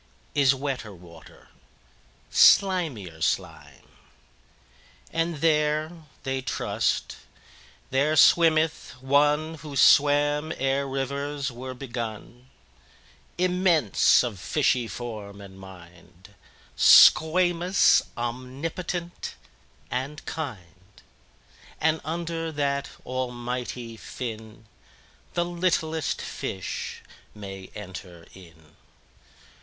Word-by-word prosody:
18Is 135 -2 +4
wetter 130 -7 -5
water, 85 -2 -16 0.8
slimier 145 - +3
slime!19And 80 - -6
there 155 -1 +2 0.3
(they 135 0 -2
trust) - - -2 0.7
there 140 +4 +2
swimmeth 160 0 +4
One20Who 150 +1 +1
swam 145 +2 +4
ere 135 +1 0
rivers 140 +1 -3
were 130 +2 -8
begun,21Immense, 130 - -1
of 115 -6 -5
fishy 125 - +1
form 105 -4 -7
and 95 -1 -12
mind,22Squamous, 105 - +3 0.2
omnipotent, 140 +9 -5 0.6
and 135 +4 -4
kind;23And 110 - -6
under 165 +1 -4
that 140 -2 -1 0.2
Almighty 125 -2 -4
Fin,24The 110 - -8
littlest 160 -3 0
fish 95 -2 -5 0.3
may 95 -2 -9
enter 90 -4 -9
in. 80 -4 -17
130 Hz, 65 wpm, -25 LUFS, 105-155 Hz, 0.8 s, 18Is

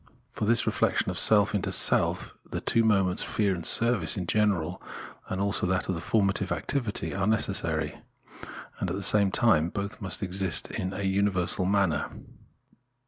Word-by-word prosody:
For - - -4
this 115 +2 +1
reflexion - - 0
of - - -3
self 105 -1 +5
into 100 - -2
self - - +1
the - - -6
two 115 - +2
moments, 95 -4 +1
fear 100 -3 0
and 85 -2 -6
service 115 -4 +3
in 90 - -3
general, 95 -4 0 0.5
as 95 - -3
also 100 -2 -1
that 95 0 -1
of 85 -3 -3
formative 100 -3 0
activityTare 105 -6 -2
necessary: 80 -8 -2 0.8
and 95 - -2
at 90 - -3
the 100 - -5
same 100 -1 +3
time 95 -7 +2
both 100 +3 -6
must 95 +1 -4
"exist 95 -2 0
in 90 - -4
a 100 +1 -5
universal 95 -2 0
manner. 95 -5 0
95 Hz, 155 wpm, -27 LUFS, 90-105 Hz, 0.8 s, self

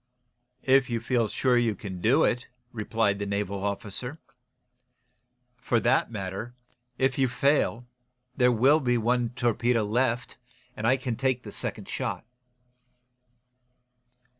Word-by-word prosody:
"If 135 -1 +4
you 115 -1 -1
feel 120 -1 +1
sure 125 +3 +2
you 115 -3 +1
can 95 -4 -7
do 130 - +4
it," 125 - 0 0.2
replied 110 -2 0
the 100 - -3
naval 100 -1 -2
officer. 100 +7 -4 1.4
"For 120 -2 +1
that - - +2
matter, 105 +2 -5 0.4
if 130 +1 +1
you 135 - +4
fail, 125 -2 +1 0.5
there'll 125 +4 +4
be 125 -4 +1
one 120 +2 +1
loaded 120 +1 -7
torpedo 120 -1 +1
left, 120 +3 -1 0.4
and 110 - -2
I 130 +2 +4
can 125 -3 -3
take 130 -1 0
the - - -8
second - - -5
shot." - - -4
120 Hz, 130 wpm, -27 LUFS, 110-125 Hz, 1.4 s, If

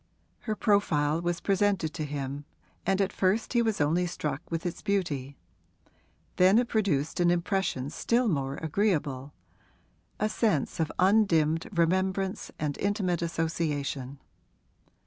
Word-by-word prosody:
Her 215 - +1
profile 165 -8 +2
was 175 0 -2
presented 195 -5 +1
to 155 - -3
him 140 0 -5 0.4
and 195 0 +2
at 195 -1 +1
first 200 +6 +1
he 240 - +4
was 220 -3 0
only 165 +4 +2
struck 150 -4 -3
with 165 0 -3
its 175 - -3
beauty; 150 -10 -2 1.0
then 185 +3 +6
it 245 0 +3
produced 175 -11 0
an 175 -1 +4
impression 175 -6 0
still 240 +6 +1
more 140 -7 -1
agreeable 150 -6 -1 0.8
a 215 - +2
sense 210 - 0
of 160 -1 0
undimmed 180 -5 +3
remembrance 190 +2 0
and 150 -2 -3
intimate 195 -4 0
association. 150 -5 -2
170 Hz, 125 wpm, -28 LUFS, 150-200 Hz, 1.0 s, then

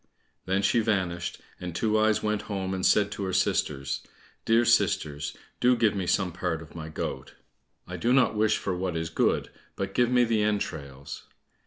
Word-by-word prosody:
Then 95 +2 +1
she 95 +5 +3
vanished, 95 -6 -1 0.2
and 90 -2 -6
Two 110 +2 +2
eyes 110 0 +2
went 105 -1 0
home 95 -2 -2
and 95 -1 -3
said 105 -1 +4
to 100 - -4
her 95 - -3
sisters, 70 -4 0 0.4
"Dear 115 +1 +4
sisters, 75 -8 +1 0.2
do 125 0 +4
give 115 -4 +2
me 95 -3 -2
some 95 -1 +1
part 80 -1 -3
of 80 - -15
my 80 -2 -7
goat; 80 - -5 0.5
I - - -5
don't 125 +2 +3
wish 110 0 +2
for 95 - -2
what 90 -2 -2
is 80 0 -3
good, - - +1 0.2
but - - -4
give 120 -1 +3
me 125 -1 +4
the 115 -2 +1
entrails." 70 -10 -3
95 Hz, 180 wpm, -27 LUFS, 80-110 Hz, 0.5 s, said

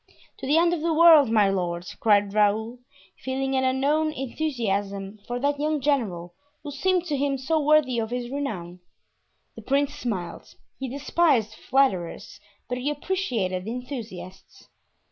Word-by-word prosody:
"To - - -6
the 295 +3 +3
end 340 +1 +4
of 335 - -2
the 330 0 0
world, 320 -5 +7
my 210 -3 +3
lord!" 175 -2 -2
cried 205 -2 +3
Raoul, 215 +3 +1 0.4
feeling 265 +1 -2
an 260 - +1
unknown 285 +4 +1
enthusiasm 210 -8 -3
for 245 - -3
that 285 +2 0
young 305 0 0
general, 210 -12 -1 0.3
who 290 - -6
seemed 360 +5 0
to 305 -4 -1
him 275 0 0
so 310 +5 0
worthy 295 -5 +3
of 220 -1 -2
his 245 0 -4
renown. 185 -11 -4 0.8
The - - -9
prince 280 +1 0
smiled; 220 -11 -5 0.2
he 265 -1 -4
despised 275 -4 +1
flatterers, 215 -8 -1 0.3
but 250 0 -3
he 265 +4 -1
appreciated 245 - -2
enthusiasts. 230 -7 -8
260 Hz, 145 wpm, -25 LUFS, 210-290 Hz, 0.8 s, world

